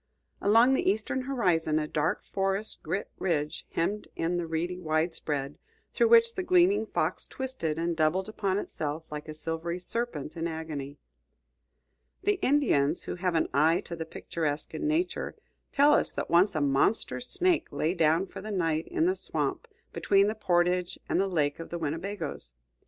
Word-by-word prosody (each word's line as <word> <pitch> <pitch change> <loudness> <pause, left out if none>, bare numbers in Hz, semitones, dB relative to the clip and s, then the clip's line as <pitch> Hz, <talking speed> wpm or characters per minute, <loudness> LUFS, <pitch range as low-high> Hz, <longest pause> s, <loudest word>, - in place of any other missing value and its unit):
Along 230 +6 +5
the 265 - +2
eastern 220 +6 0
horizon 180 - +1
a 155 -1 0
dark 150 +1 -1
forest 195 +2 -2
girt 200 - -2
ridge 155 -4 -1
hemmed 205 +6 -1
in 170 +2 0
the 170 -1 -2
reedy 170 +3 -2
widespread, 155 -4 -2 0.3
through 470 - +3
which 460 0 +6
the 375 - -2
gleaming 365 +2 +3
Fox - - -1
twisted 260 - -3
and 170 +1 -1
doubled 160 +5 +1
upon 200 -3 -1
itself 155 -5 -4
like 150 +1 -6
a 155 - -7
silvery 165 +2 -3
serpent 180 - -3
in 165 0 -2
agony. 155 -4 -5 1.3
The 410 0 +1
Indians, 180 - +2
who - - -4
have 180 -1 0
an 160 - +2
eye 160 +6 +4
to 170 - -7
the 165 -1 -5
picturesque 155 -3 -3
in 315 - -2
Nature, 330 +4 -1 0.4
tell 290 +1 +5
us - - +3
that - - -4
once 175 +3 +4
a 155 - +1
monster 140 +10 +1
snake 350 +7 +1
lay 155 +4 0
down 165 +1 +3
for - - -9
the 215 - -7
night 165 -5 0
in 335 -2 +1
the 370 +2 +2
swamp - - -2 0.3
between 195 0 +3
the 210 - 0
portage 180 -3 +1
and - - +2
the 195 - +1
lake 150 -6 0
of 165 - -7
the 170 - -4
Winnebagoes. 160 - -4
175 Hz, 170 wpm, -29 LUFS, 155-215 Hz, 1.3 s, which